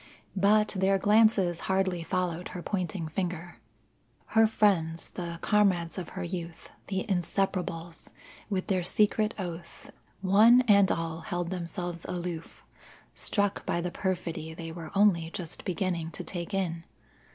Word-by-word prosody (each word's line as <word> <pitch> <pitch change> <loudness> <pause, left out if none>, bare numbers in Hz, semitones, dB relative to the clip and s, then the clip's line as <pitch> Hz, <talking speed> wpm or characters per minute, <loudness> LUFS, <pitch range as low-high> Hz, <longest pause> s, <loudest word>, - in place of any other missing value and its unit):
But 210 +2 +4
their 195 0 +2
glances 205 -4 +4
hardly 190 -2 +1
followed 180 0 -2
her 175 - -6
pointing 185 -3 -2
finger. 175 +1 -4 0.7
Her 225 0 +6
friends 175 -7 +1
the 170 -1 -5
comrades 190 -4 +2
of 175 - -6
her 190 - -2
youth, 170 -2 -6 0.2
the 190 -1 -2
Inseparables 175 -3 -2 0.4
with 190 -3 -1
their 185 -3 +1
secret 210 +4 +2
oath 170 -3 -7 0.3
one 215 +6 +6
and 200 -5 +5
all 165 -1 -2
held 175 +2 -3
themselves 175 -1 -4
aloof, 175 -2 -5 0.5
struck 205 -2 0
by - - +1
the 175 +1 -2
perfidy 170 -4 -3
they 165 -1 -6
were 165 -1 -7
only 190 -5 +4
just 170 -1 -7
beginning 175 -2 -1
to - - -6
take 175 0 -5
in. 175 -4 -1
180 Hz, 135 wpm, -29 LUFS, 170-195 Hz, 0.7 s, Her